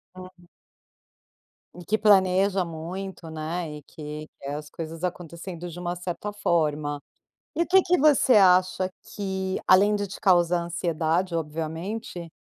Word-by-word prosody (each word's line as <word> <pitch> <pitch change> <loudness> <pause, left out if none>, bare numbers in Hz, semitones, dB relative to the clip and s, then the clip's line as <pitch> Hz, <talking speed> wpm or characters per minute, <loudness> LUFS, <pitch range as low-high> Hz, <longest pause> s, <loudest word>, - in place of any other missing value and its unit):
Hum. 185 -1 -13 1.3
E 175 0 -11
que 215 - +1
planeja 195 -2 +4
muito, 170 +2 -7
né, 160 0 -4
e 150 - -11
que 150 +1 -8 0.2
é 140 +1 -3
as 150 0 -7
coisas 165 +2 -5
acontecendo 175 0 -6
de 170 +1 -9
uma 175 0 -3
certa 180 +4 -5
forma. 150 -7 0 0.6
E 340 - +1
o - - -1
que 380 +2 +6
que 360 +1 +2
você 285 -4 +5
acha 185 -1 +4 0.2
que, 190 -2 -2
além 200 +3 +6
de 205 -1 -2
te 195 - -9
causar 175 -2 +3
ansiedade, 170 +1 -1
obviamente, 165 +4 -4
175 Hz, 140 wpm, -26 LUFS, 165-190 Hz, 1.3 s, que